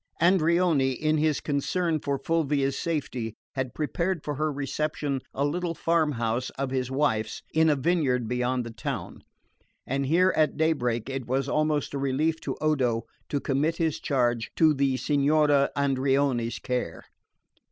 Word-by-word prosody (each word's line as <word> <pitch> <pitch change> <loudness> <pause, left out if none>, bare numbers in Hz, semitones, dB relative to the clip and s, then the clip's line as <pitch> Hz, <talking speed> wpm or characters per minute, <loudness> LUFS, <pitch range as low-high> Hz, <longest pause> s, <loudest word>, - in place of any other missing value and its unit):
Andreoni, 170 -5 +3
in 155 +4 0
his 155 -1 +2
concern 160 +3 0
for 140 -1 -1
Fulvia's 140 -2 0
safety, 130 -9 -3 0.2
had 130 -2 -3
prepared 170 +2 -1
for 150 - -3
her 155 +2 -1
reception 145 0 -2
a 140 - -1
little 170 +3 -2
farm 160 -1 +1
house 115 +1 -1
of 135 -1 -2
his 130 -1 -1
wife's, 120 -6 0
in 160 0 +4
a 150 - +4
vineyard 135 -5 +1
beyond 125 +1 0
the 115 - -6
town; 110 - -5 0.6
and 135 +1 -1
here 180 +5 +4
at 155 -3 +2
daybreak 125 -8 0
it 135 -2 -4
was 135 +2 0
almost 150 -1 0
a 140 - -2
relief 145 +4 0
to - - -3
Odo 130 -7 +1 0.3
to 145 - 0
commit 145 +5 0
his 160 -3 0
charge 120 -4 0
to 160 -2 +5
the 135 -2 +1
Signora 145 +1 +3
Andreoni's 135 -3 +1
care. 125 -10 -3
140 Hz, 150 wpm, -27 LUFS, 130-155 Hz, 0.6 s, to